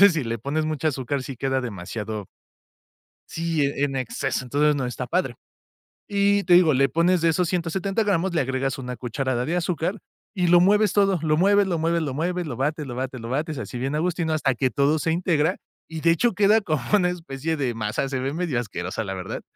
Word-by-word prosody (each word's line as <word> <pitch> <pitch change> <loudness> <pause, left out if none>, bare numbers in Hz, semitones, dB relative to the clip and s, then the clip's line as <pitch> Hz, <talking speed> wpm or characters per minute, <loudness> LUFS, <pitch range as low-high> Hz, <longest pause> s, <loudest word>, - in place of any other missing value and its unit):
Entonces, 200 -2 +8
si 155 -4 -1
le 115 0 -3
pones 145 +6 -2
mucha 155 0 -1
azúcar, 135 0 -2
sí 135 - -7
queda 135 +1 0
demasiado 105 -1 -5 1.0
Sí, 165 -1 -1
eh, 140 0 0
en 135 -1 -2
exceso, 130 0 -2
entonces, 145 +4 +2
no 135 -3 -1
está 125 0 -4
padre. 170 -8 -1 0.7
Y 200 0 +2
te 175 - +6
digo, 165 -5 +6
le 135 +1 +3
pones 170 +4 +2
de 165 - +3
esos 175 +1 +1
170 190 +5 -1
gramos, 190 -2 0
le 160 - +2
agregas 135 +1 -2
una 125 -1 -5
cucharada 125 +1 -2
de 170 - -1
azúcar 180 +3 -1 0.3
y 180 -4 0
lo 175 0 +6
mueves 205 +2 +4
todo, 195 -4 +3
lo 155 -1 +1
mueves, 200 +2 +4
lo 175 -3 0
mueves, 165 +1 +1
lo 140 -4 -2
mueves, 175 +1 -2
lo 125 - -4
bates, 150 +1 -1
lo 120 - -6
bates, 130 -1 -4
lo 115 - -6
bates, 150 +2 -2
así 115 +2 -6
bien 135 +4 -2
agustino 165 0 0
hasta 140 -5 +1
que 130 +1 0
todo 145 +3 +2
se 160 +2 0
integra, 165 0 +1 0.3
y 160 -1 -5
de 165 - +3
hecho, 235 +8 +2
queda 210 +3 +4
como 155 -8 -1
una 180 -4 +4
especie 160 -2 -3
de 130 -4 -1
masa, 110 +4 -2
se 130 - -2
ve 135 +2 -2
medio 160 -8 -1
asquerosa 95 -1 -4
la 95 -1 -4
verdad, 95 0 -5
155 Hz, 220 wpm, -24 LUFS, 130-175 Hz, 1.0 s, Entonces